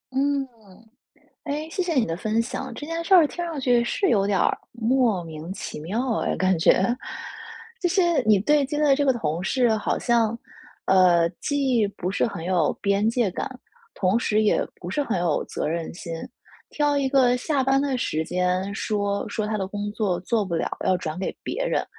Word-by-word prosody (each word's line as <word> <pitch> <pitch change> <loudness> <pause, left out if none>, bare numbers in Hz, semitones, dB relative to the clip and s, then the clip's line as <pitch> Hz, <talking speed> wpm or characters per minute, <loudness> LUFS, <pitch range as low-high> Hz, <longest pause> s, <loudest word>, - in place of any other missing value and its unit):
嗯。 275 0 +1 1.0
诶， 300 +2 -3
谢 370 - -1
谢 345 -2 -2
你 250 -4 +2
的 165 0 -3
分 215 +4 0
享， 260 +2 -4
这 295 - -7
件 330 +1 -3
事 380 - +4
儿 335 -4 +7
听 345 +4 -5
上 320 -5 -4
去， 245 -2 +3
是 380 +10 0
有 200 -3 +3
点 200 -2 +1
儿 - - +2
莫 235 -5 +1
名 160 +2 -7
其 170 - -7
妙 225 +8 -1
哎， - - -1
感 185 -1 +2
觉。 175 +3 +4 1.0
这 355 - +1
些 345 -5 +2
你 215 -2 +5
对 290 +7 +3
接 295 +3 -3
的 285 -2 +5
这 285 +1 +1
个 265 - +4
同 165 -7 -2
事 245 +4 +2
好 210 - -1
像， 230 -1 +1 0.5
呃， 175 -3 +5
既 265 -7 +1
不 185 -2 -4
是 - - +1
很 175 -5 -7
有 175 -4 +2
边 200 +2 +2
界 235 -4 +1
感， - - -3 0.5
同 190 +4 +2
时 215 -2 +1
也 210 - +2 0.2
不 175 - -7
是 290 +10 0
很 225 -9 -1
有 175 -3 0
责 - - -3
任 165 +1 -3
心。 170 -1 -8 0.6
挑 290 -1 +1
一 275 -1 +1
个 255 -2 +4
下 275 +1 0
班 270 +1 +3
的 270 -3 -1
时 160 -9 -1
间 180 +3 -1
说 200 -1 -1
说 215 -1 -2
他 215 -1 -2
的 190 - -2
工 205 +1 -4
作 195 -5 -1
做 215 +2 0
不 175 -3 -4
了， 165 - 0 0.2
要 185 - +3
转 160 -1 -5
给 195 - -3
别 - - -2
人。 - - 0
220 Hz, 215 characters per minute, -24 LUFS, 185-275 Hz, 1.0 s, 儿